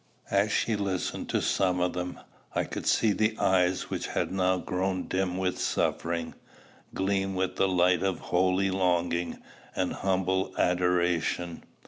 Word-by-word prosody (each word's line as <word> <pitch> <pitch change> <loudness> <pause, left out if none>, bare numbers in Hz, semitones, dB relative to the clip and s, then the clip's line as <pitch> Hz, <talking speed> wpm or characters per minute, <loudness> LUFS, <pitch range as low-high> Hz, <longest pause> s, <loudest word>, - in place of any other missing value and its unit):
As 100 +1 +2
she 110 - +1
listened 100 -3 -2
to - - 0
some 90 -2 +1
of 90 0 +1
them, 90 0 -4 0.4
I - - +2
could - - -5
see 110 - +4
the 110 +1 +1
eyes 95 -1 +2
which - - -2
had - - -1
now 95 -1 +2
grown 95 +1 -1
dim 95 -1 -1
with 95 -1 -1
suffering, 85 -1 -1 0.6
gleam 95 0 -1
with 95 0 -1
the 95 - +3
light 90 -1 +3
of 95 -2 0
holy 95 +2 +1
longing 90 -2 0 0.3
and 90 -1 0
humble 95 0 0
adoration. 90 -1 +1
95 Hz, 145 wpm, -28 LUFS, 90-95 Hz, 0.6 s, see